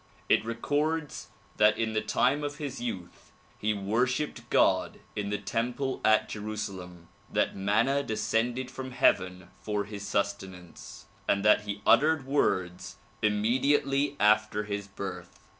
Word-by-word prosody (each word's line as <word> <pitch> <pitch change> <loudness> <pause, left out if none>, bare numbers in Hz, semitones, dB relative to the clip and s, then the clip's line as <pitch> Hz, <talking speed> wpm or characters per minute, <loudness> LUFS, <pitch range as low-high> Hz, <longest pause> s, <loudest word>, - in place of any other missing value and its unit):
It - - +4
records 145 +7 -2 0.3
that 105 0 +5
in 110 -1 -1
the 110 - +1
time 145 +3 +1
of 145 0 -3
his 140 -4 -5
youth 105 -8 -6 0.3
he 110 - +1
worshipped 120 +8 -1
God - - +2 0.2
in 100 -1 -2
the 105 - -1
temple 120 +6 -2
at 110 0 +4
Jerusalem; 95 -5 -6 0.2
that - - +1
manna 110 +8 +2
descended 120 +2 -1
from 130 0 -7
heaven 90 -8 +1
for 105 -1 -2
his 100 0 -8
sustenance 95 -3 -4 0.2
and 100 0 +2
that 105 0 +5
he 100 -1 -5
uttered 155 -2 +4
words 95 -10 -1 0.3
immediately 135 +6 +1
after 105 0 +3
his 100 -1 -4
birth. 95 -3 -7
110 Hz, 130 wpm, -28 LUFS, 100-130 Hz, 0.3 s, that